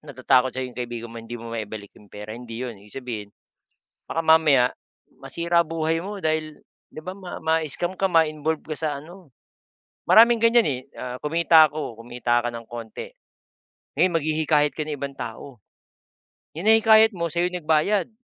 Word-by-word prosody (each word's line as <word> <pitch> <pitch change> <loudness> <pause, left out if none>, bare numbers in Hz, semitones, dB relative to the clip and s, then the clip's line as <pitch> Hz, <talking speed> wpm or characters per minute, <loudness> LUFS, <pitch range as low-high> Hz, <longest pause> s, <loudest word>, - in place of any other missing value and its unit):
natatakot 130 -1 +2
sa 130 0 -3
yung 125 - -8
kaibigan 120 -1 -6
mo, 115 - -8
hindi 115 +1 -8
mo 115 0 -9
maibalik 110 -2 -6
yung 105 - -18
pera, 105 +1 -8
hindi 120 +1 -7
'yon. 115 -5 -7
Ibig 105 0 -13
sabihin, 110 -5 -5 0.8
baka 165 - -2
mamaya 155 -6 +5 0.5
masira 170 0 0
buhay 160 0 -1
mo, 200 +2 -7
dahil 155 -1 -2 0.3
'di 155 - -8
ba, 185 - -5
ma 185 -2 -8
mascam 160 +2 -1
ka, 195 - +1
ma-involve 160 -3 +1
ka 155 -1 -5
sa 155 - -1
ano. 170 -2 -15 0.7
Maraming 235 +1 +7
ganyan, 230 +1 +5
eh, 135 -4 -1 0.2
ah, 125 0 -6
kumita 160 +1 +5
ko, 150 -7 -6
kumita 120 0 0
ka 120 - -3
nang 115 -1 -6
kaunti, 115 - -8 0.9
ngayon 180 -2 +3
maghihikayat 155 -1 +1
ka - - -5
ng 150 -1 -4
ibang 140 0 -5
tao. 135 -3 -8 1.0
Yung 175 - -5
nahikayat 220 0 +6
mo, 170 -2 -3
sa'yo 175 +3 -1
nagbayad, 170 +3 +1
155 Hz, 165 wpm, -24 LUFS, 120-170 Hz, 1.0 s, Maraming